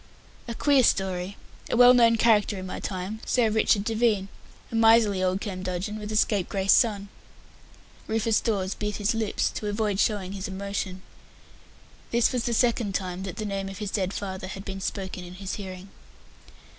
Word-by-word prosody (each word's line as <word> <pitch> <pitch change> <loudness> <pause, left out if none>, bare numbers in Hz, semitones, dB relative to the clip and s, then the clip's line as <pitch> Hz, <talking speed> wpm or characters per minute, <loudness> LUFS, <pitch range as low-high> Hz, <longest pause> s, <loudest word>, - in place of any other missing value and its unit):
"A 235 - -5
queer 280 +1 +4
story. 190 -3 0 0.3
A - - 0
well 245 0 +8
known 230 -2 +5
character 220 -3 +3
in 185 - -6
my 185 - -5
time 190 +3 -5
Sir 235 -3 +2
Richard 215 -2 +2
Devine. 220 -3 +1 0.4
A - - -4
miserly 225 -3 +5
old 185 +1 0
curmudgeon, 185 +1 -4
with 210 0 -6
a - - -2
scapegrace 195 -2 +2
son." 205 -4 +2 1.0
Rufus 220 0 +1
Dawes 195 -3 -1
bit 210 -1 -4
his 205 +2 0
lips 225 -2 -1
to 210 - -5
avoid 205 -1 -1
showing 200 -4 0
his 195 -1 -5
emotion. 190 -1 -4 1.1
This 235 +2 +2
was 245 -2 -1
the 235 - 0
second 230 -4 +1
time 185 -1 -3
that 190 -3 -5
the 215 - -4
name 195 -1 -3
of 195 - -8
his 205 -1 -4
dead 190 -3 -1
father 190 -2 -5
had 195 +1 -8
been 195 0 -6
spoken 190 -1 -4
in 175 0 -10
his 190 0 -5
hearing. 185 0 -8
200 Hz, 175 wpm, -26 LUFS, 190-220 Hz, 1.1 s, well